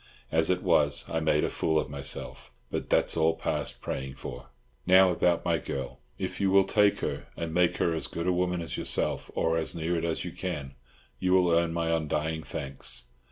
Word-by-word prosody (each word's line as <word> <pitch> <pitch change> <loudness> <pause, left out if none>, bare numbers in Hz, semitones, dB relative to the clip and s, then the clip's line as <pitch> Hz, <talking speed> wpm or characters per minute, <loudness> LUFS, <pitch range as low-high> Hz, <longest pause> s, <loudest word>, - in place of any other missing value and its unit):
As 80 0 +3
it 90 0 +1
was, 75 -1 +2
I 80 - -1
made 80 -1 +2
a - - +1
fool 80 -1 +1
of - - -2
myself. 70 -1 -4 0.2
But - - -3
that's - - +3
all 80 0 +3
past - - -3
praying 65 0 -4
for. 60 0 -8 0.4
Now 95 0 +7
about 85 0 +1
my 85 -2 +2
girl. 70 -1 -5 0.2
If - - -4
you 100 - +3
will 95 0 +6
take 100 +1 +3
her, - - -3
and 85 -1 -4
make 90 0 +3
her 85 - +1
as 80 -3 -1
good 85 - -4
a 90 - +2
woman 90 -1 0
as 80 - -4
yourself, - - 0
or 80 0 +1
as 80 - -2
near 85 +1 -1
it 85 - -1
as 85 -1 -1
you - - -4
can, 75 -7 -5 0.5
you 90 0 +1
will 90 -2 +4
earn 85 0 +3
my 85 0 -1
undying 80 0 -1
thanks. - - -6
80 Hz, 205 wpm, -28 LUFS, 80-90 Hz, 0.5 s, Now